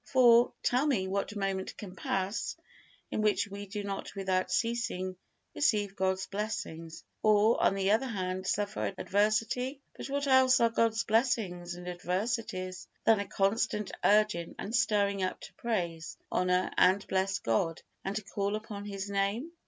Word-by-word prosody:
For, 240 -2 +5
tell 255 +5 +2
me, 205 -10 +1
what 200 +2 -2
moment 195 -1 -2
can 190 -3 -8
pass 190 +2 -2 0.5
in - - -1
which 210 -1 +2
we 200 0 -7
do 205 +1 -5
not 200 0 -5
without 190 -1 0
ceasing 230 -6 -1 0.4
receive 210 -8 +1
God's 190 -1 0
blessings, 200 -6 -5 0.2
or, 215 +1 +4
on - - +3
the 195 0 +1
other 225 +5 +2
hand, 185 -4 -3
suffer 205 -1 -1
adversity? 225 +6 0 0.2
But - - -6
what 280 +1 -1
else 260 -1 +5
are 230 -1 +4
God's 230 0 +2
blessings 210 -7 0
and 180 0 -9
adversities 185 +1 -3 0.2
than 225 -2 +5
a 200 - -3
constant 205 +1 0
urging 210 -5 +3
and 220 +4 -4
stirring 200 -3 +2
up 185 - -2
to - - -11
praise, 170 -8 -3
honor, 180 0 +1
and 190 +2 +4
bless 190 +1 +1
God, 165 - -1 0.2
and 195 +1 -3
to 215 - -2
call 200 +1 -2
upon 210 -1 -6
His 200 -1 -5
Name? 200 +9 -1
200 Hz, 155 wpm, -30 LUFS, 190-225 Hz, 0.5 s, For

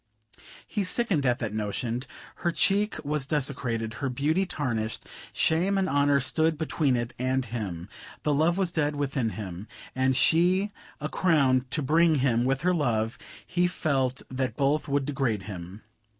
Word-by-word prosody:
He 205 - -2
sickened 185 - +1
at 120 -1 +2
that 110 -2 -4
notion. 110 +3 -2 0.4
Her 170 - 0
cheek 205 +4 +2
was 145 -2 -1
desecrated, 125 -6 0
her 135 - 0
beauty 155 +9 0
tarnished; 115 -9 -3 0.3
shame 180 +5 +2
and 190 -1 +1
honor 140 -2 +3
stood 160 +4 +1
between 150 -3 +1
it 120 0 -2
and 130 0 0
him. 100 -7 -5 0.4
The 150 - +2
love 160 +5 +2
was 190 -3 0
dead 150 -3 0
within 135 -4 -1
him; 95 -1 -6 0.3
had 130 0 +2
she 180 +8 +3 0.3
a 150 - -2
crown 140 -7 +2
to 150 +2 -1
bring 160 +3 +4
him 125 -4 +2
with 135 +1 +1
her 180 +2 +2
love, 115 -8 0 0.3
he 180 0 +1
felt 135 -7 -1
that 130 -3 -2
both 145 +2 +1
would 140 -1 0
degrade 130 -8 -1
him. 95 0 -8
140 Hz, 160 wpm, -27 LUFS, 120-160 Hz, 0.4 s, bring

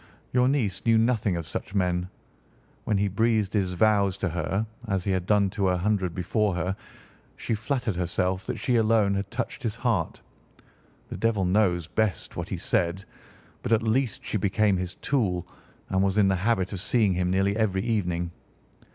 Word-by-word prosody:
Your 125 0 +4
niece 120 -9 0
knew 115 -1 +4
nothing 110 -4 +2
of 85 - -4
such 100 - -6
men. 90 -1 0 0.8
When 105 - +1
he 100 +1 +2
breathed 110 0 +1
his 95 -4 0
vows 100 0 +3
to - - -1
her, 90 +6 -1 0.2
as 95 -3 0
he 100 - -1
had 95 -1 -1
done 100 -2 +3
to 100 -2 0
a 90 - +1
hundred 95 -2 0
before 95 +2 0
her, 90 +2 -1 0.6
she - - -3
flattered 115 -1 -1
herself 90 +1 -1
that - - -2
she 125 -2 +1
alone 110 -3 +3
had 100 0 -2
touched 120 +1 -4
his 115 -2 -2
heart. 115 -9 -1 0.9
The - - -5
devil 110 -4 +1
knows 90 -3 +2
best 110 +1 -1
what - - -4
he - - -3
said, 90 +3 -1 0.6
but 125 - -4
at 115 0 +3
least 115 +2 0
she - - -1
became 100 +1 +2
his 90 0 -4
tool 95 -11 0 0.4
and 95 0 +1
was 100 +1 +1
in 100 -2 +5
the 95 - +2
habit 95 -1 0
of 95 - -4
seeing 105 0 +2
him 90 0 0
nearly 95 +2 +2
every 100 -4 +1
evening." 90 -7 -1
100 Hz, 185 wpm, -26 LUFS, 90-110 Hz, 0.9 s, in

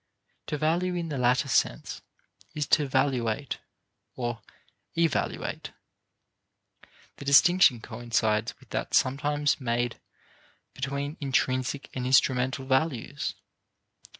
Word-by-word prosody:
To 150 - -2
value 170 +4 +1
in 170 -2 -3
the 140 -3 -3
latter 125 +2 +2
sense - - 0 0.5
is 150 -1 -1
to 150 -2 +4
valuate 130 -1 0 0.6
or 120 -2 -3 0.6
evaluate. 165 -4 -1 1.4
The 140 - -9
distinction 140 -2 +6
coincides 110 -3 -1
with - - -20
that - - -2
sometimes 145 +2 +1
made 120 -1 -1 0.7
between 140 +3 -4
intrinsic 130 0 -1
and 125 -1 -3
instrumental 130 0 +2
values. 130 -2 -1
135 Hz, 95 wpm, -27 LUFS, 125-145 Hz, 1.4 s, distinction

